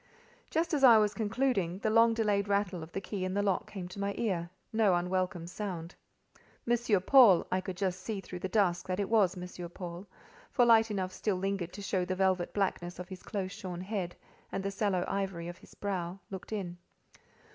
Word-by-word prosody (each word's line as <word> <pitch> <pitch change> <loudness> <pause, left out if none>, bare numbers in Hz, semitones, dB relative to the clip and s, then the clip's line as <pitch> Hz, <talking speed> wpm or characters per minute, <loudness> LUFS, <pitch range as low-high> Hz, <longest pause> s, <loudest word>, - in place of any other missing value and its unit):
Just 330 +1 0
as 285 -2 +1
I 240 -4 +9
was 210 -1 +3
concluding, 210 -4 0
the 215 +2 0
long 230 +1 +5
delayed 205 -3 +1
rattle 200 -3 0
of 160 +1 -9
the 195 - -3
key 195 0 -4
in 185 +1 -2
the 205 - +1
lock 195 -2 0
came 190 -3 -6
to 185 - -9
my 200 0 -1
ear—no 190 +1 0
unwelcome 180 -1 -1
sound. 175 -2 -5 0.7
M. 235 -5 +2
Paul 230 -8 +7
(I 185 - +1
could 185 -1 -6
just 190 -2 -1
see 205 +2 -4
through 180 -1 -7
the 190 - -3
dusk 185 -4 +1
that 185 +1 -2
it 200 - -1
was 200 -5 +3
M. 180 -1 -7
Paul, 175 +1 -7 0.4
for 245 - +3
light 225 -1 +6
enough 190 -3 -2
still 205 +1 -1
lingered 190 -2 -2
to 205 - -7
show 190 -2 0
the 185 +1 -2
velvet 185 -2 +1
blackness 180 -3 -1
of 180 0 -7
his 185 -1 -8
close 190 -2 -4
shorn 180 -3 -6
head, 185 -3 -3 0.4
and 195 - -3
the 195 - -1
sallow 195 -3 0
ivory 195 -4 -2
of 175 0 -8
his - - -17
brow) 185 -3 -3
looked 190 +2 -7
in. 180 -5 -4
190 Hz, 200 wpm, -31 LUFS, 180-210 Hz, 0.7 s, I